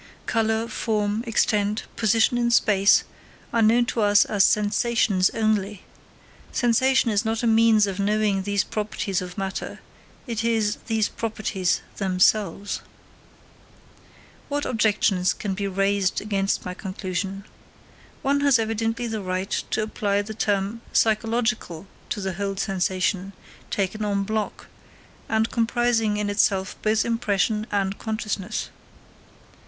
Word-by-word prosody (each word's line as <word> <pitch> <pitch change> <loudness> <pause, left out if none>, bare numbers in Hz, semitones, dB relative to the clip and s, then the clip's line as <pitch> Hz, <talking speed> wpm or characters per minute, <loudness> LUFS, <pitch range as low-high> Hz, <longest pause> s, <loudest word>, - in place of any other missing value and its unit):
Colour, 225 0 0
form, 215 -1 -1
extent, 210 -1 +1
position 225 +2 +2
in 240 0 +1
space, 200 -4 +4 0.5
are 230 - +3
known 230 +2 +4
to 230 - -2
us 205 0 +5
as 205 -2 +2
sensations 210 -2 +2
only. 210 -3 -1 0.7
Sensation 250 +1 +2
is 210 +1 +1
not 225 +1 -1
a - - +2
means 225 -1 +5
of 195 -1 -4
knowing 205 -1 +1
these 200 0 0
properties 210 -3 -3
of 180 +1 -8
matter, 195 -1 -4 0.5
it 230 -4 -3
is 220 -2 +1
these 220 -2 +1
properties 215 -5 -2 0.2
themselves. 195 +1 +1 1.7
What 290 0 -1
objections 210 -5 +2
can 200 -2 -4
be 200 +1 -2
raised 195 0 +1
against 200 -2 -1
my 180 - -4
conclusion? 190 +1 -4 0.8
One 280 +1 +2
has 280 -3 +4
evidently 225 +1 -1
the 220 -2 -3
right 185 +1 -3 0.2
to 215 - 0
apply 205 -1 -1
the 220 +1 -7
term 205 +1 -1
psychological 225 -5 0 0.2
to 205 - -3
the 190 -1 -2
whole 195 +2 -3
sensation, 190 0 -1 0.4
taken 200 +2 -2
en 200 -1 0
bloc, 215 +1 -3 0.6
and 220 0 +1
comprising 230 -2 +1
in 210 0 -1
itself 195 -2 +1
both 215 0 +2
impression 220 -1 0
and 195 -1 -1
consciousness. 215 -2 -3
210 Hz, 125 wpm, -24 LUFS, 195-225 Hz, 1.7 s, us